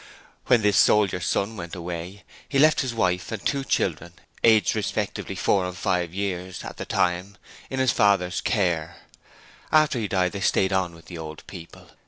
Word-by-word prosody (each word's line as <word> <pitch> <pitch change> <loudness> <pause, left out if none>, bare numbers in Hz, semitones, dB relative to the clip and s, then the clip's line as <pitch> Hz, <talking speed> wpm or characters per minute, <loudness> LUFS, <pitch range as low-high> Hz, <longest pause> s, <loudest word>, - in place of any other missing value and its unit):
When 120 -4 +4
this 105 -1 +3
soldier 100 -4 +4
son 100 +6 -1
went 85 -1 -7
away, 90 +3 -6 0.3
he 140 - 0
left 155 +2 +5
his 130 -3 -2
wife 90 -6 -1
and 110 -4 -5
two 140 -1 0
children, 85 - -1 0.3
aged 110 -2 +4
respectively 105 -2 -3
four 95 +1 +2
and 90 0 -5
five 90 -2 -1
years 95 -1 -4
at - - -8
that - - -7
time, 90 +3 0 0.3
in 130 - -4
his 130 -2 +3
father's 95 -3 +2
care. 85 -7 0 0.8
After 155 -4 +4
he 110 - -2
died 90 -1 +1
they 100 - -6
stayed 95 0 +2
on 90 -3 0
with 85 0 -16
the 85 -1 -9
old 80 -1 -8
people. 85 -4 -12
95 Hz, 180 wpm, -24 LUFS, 90-105 Hz, 0.8 s, left